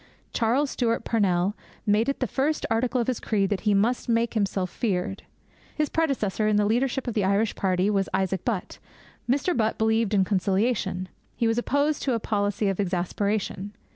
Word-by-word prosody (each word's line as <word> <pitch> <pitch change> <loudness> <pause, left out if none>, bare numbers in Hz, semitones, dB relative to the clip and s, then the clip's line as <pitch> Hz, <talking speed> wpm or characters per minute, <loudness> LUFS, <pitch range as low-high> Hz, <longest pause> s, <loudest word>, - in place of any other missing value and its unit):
Charles 250 +5 +1
Stewart 230 -2 0
Parnell 195 -3 +1 0.3
made 215 +3 +2
it 275 - -2
the - - +3
first 295 +3 -1
article 245 +3 +1
of 235 - +1
his 255 -1 -1
creed 200 -3 0
that 200 - +1
he 205 - +4
must 235 +5 +1
make 230 0 +1
himself 195 -4 -1
feared. 195 -4 -2 0.5
His 300 -1 0
predecessor 245 -10 0
in 215 - +2
the 205 0 +3
leadership 250 +4 0
of 240 - -1
the 210 - +1
Irish 200 +3 +2
party 185 0 +1
was 195 -2 +1
Isaac 190 -1 -1
Butt. 215 -7 -3 0.5
Mr. 285 +7 +1
Butt 220 -1 +1
believed 220 -1 +2
in 190 -1 +4
conciliation. 190 -1 0 0.3
He 235 - 0
was 225 +1 +2
opposed 285 +4 +1
to 265 - 0
'a 230 - 0
policy 205 -1 0
of 195 -1 -1
exasperation.' 200 +2 -1
215 Hz, 180 wpm, -26 LUFS, 195-240 Hz, 0.5 s, he